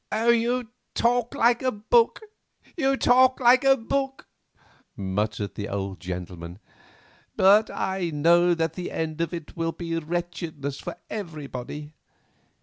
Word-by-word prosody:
"You 235 +1 +1 0.2
talk 240 0 +1
like 235 +1 +3
a 260 -1 +1
book—you 325 - -1
talk 255 +1 +4
like 250 +1 +5
a 270 0 +5
book," 270 +3 -3 0.7
muttered 100 +1 -2
the 105 - -5
old 95 -2 -4
gentleman. 90 0 -7 0.8
"But 205 +3 +5
I 190 -2 -2
know 170 +3 +4
that 165 -1 -1
the 180 +1 -5
end 160 0 -3
of 170 - -1
it 165 -4 -7
will 165 -1 -2
be 165 -1 -3
wretchedness 165 -4 -4
for - - -6
everybody. 150 - -7
175 Hz, 125 wpm, -25 LUFS, 145-240 Hz, 0.8 s, like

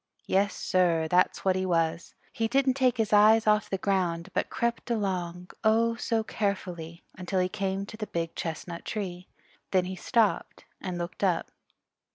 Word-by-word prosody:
Yes, 200 +1 +1
sir, 170 -3 +2
that's 180 +4 +2
what 190 -1 +3
he 185 - 0
was. 165 -2 0 0.2
He 225 - 0
didn't 270 +2 +2
take 255 -2 +2
his 220 -2 0
eyes 215 +2 +6
off 210 -1 +3
the 195 - -1
ground, 185 -3 0
but - - 0
crept 235 0 -2
along, 180 -5 -2
oh 230 +1 +3
so 230 -1 -1
carefully, 180 -6 -3
until 185 +1 -2
he 180 - +2
came 195 0 -2
to 215 - -10
the 215 -1 -4
Big 165 -1 -3
Chestnut 170 +1 -5
Tree. 185 -4 -5 0.4
Then 185 -2 +2
he 185 +1 -5
stopped 220 +2 0 0.2
and 180 -2 -4
looked 175 +2 -5
up. 185 -3 +1
190 Hz, 170 wpm, -28 LUFS, 175-215 Hz, 0.4 s, eyes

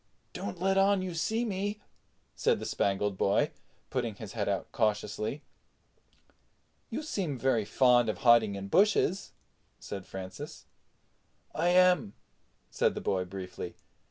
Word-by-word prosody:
"Don't 100 - -5
let 195 +1 +2
on 195 -1 +3
you 185 -2 -4
see 220 +9 0
me," 205 0 -2 0.6
said - - +2
the - - -5
Spangled 100 0 0
Boy, 100 - +2 0.4
putting 120 -5 -2
his 105 0 -9
head 105 -3 -1
out 100 -2 -2
cautiously. 110 +3 -1 1.5
"You - - -4
seem 185 - -2
very 120 -4 +1
fond 120 +1 +4
of 110 - -2
hiding 115 -4 +6
in 100 0 -5
bushes," 195 - +2 0.5
said 95 -2 -7
Francis. 95 -1 -8 0.9
"I - - 0
am," 180 - +4 0.6
said - - +1
the - - -3
boy 95 -1 0
briefly. 90 -1 -7
120 Hz, 130 wpm, -30 LUFS, -, 1.5 s, hiding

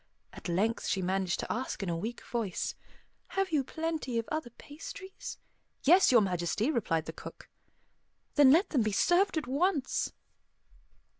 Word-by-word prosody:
At - - -7
length 210 +7 0
she 190 - 0
managed 185 0 0
to - - -4
ask 245 -3 -3
in 190 - -2
a 170 - 0
weak 225 +8 -5
voice, 225 -6 -2 0.6
"Have 390 -2 +1
you 295 -4 +2
plenty 315 -4 -3
of 230 - -1
other 310 -5 -2
pastries?" 315 - -9 0.5
"Yes, 355 +4 +6
Your 240 -3 +7
Majesty," 185 - 0
replied 165 - 0
the - - -6
cook. - - -10 0.9
"Then 290 -3 +7
let 330 +9 +5
them 270 - +3
be 215 -1 0
served 355 - +3
at 310 - -1
once." 285 +2 0
250 Hz, 155 wpm, -31 LUFS, 195-315 Hz, 0.9 s, Your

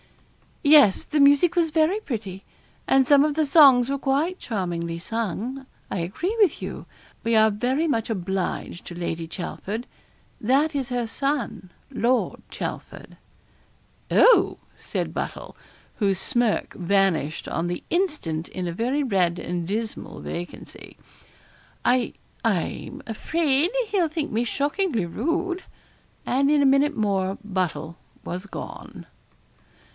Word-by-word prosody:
'Yes, 285 -9 +6
the 305 - -1
music 285 +5 +5
was 335 -2 +2
very 320 +6 +2
pretty, 205 - -5 0.4
and 270 -1 +4
some 285 +1 +6
of 300 -1 0
the 310 -1 +2
songs 275 -4 +6
were 275 0 -1
quite 295 +8 0
charmingly 170 -6 -3
sung. 230 +6 -4 0.3
I - - -1
agree 310 - -2
with 400 -8 +4
you - - -6 0.4
we 230 0 +1
are 220 0 +5
very 255 +9 0
much 230 -7 0
obliged 190 -3 -3
to 175 - -8
Lady 170 -1 -3
Chelford 200 +6 -5 0.5
that 275 +7 +2
is 270 -3 -2
her 245 -1 -1
son, 240 -6 -3 0.2
Lord 250 -1 0
Chelford.' - - -7 0.9
'Oh!' - - +5 0.2
said - - -3
Buttle, - - -5 0.4
whose 195 -4 +1
smirk 240 -2 0
vanished 175 -5 +1
on 170 - -2
the 175 0 -4
instant 295 - -1
in 180 -1 -4
a 170 - -3
very 255 +9 0
red 185 -8 +1
and 175 -1 -3
dismal 220 +3 -4
vacancy, 175 +1 -8 0.9
'I 245 -1 +2 0.3
I'm 225 - -2
afraid 295 +6 +1 0.2
he'll 375 -5 +2
think 310 -1 -3
me 225 +2 +1
shockingly 285 - 0
rude.' 345 - -2 0.6
And 275 +2 +2
in 295 -1 +4
a - - +4
minute 280 +2 +3
more 195 -2 0
Buttle 180 -4 -3 0.3
was 180 +3 -5
gone. - - -8
240 Hz, 130 wpm, -24 LUFS, 190-290 Hz, 0.9 s, Yes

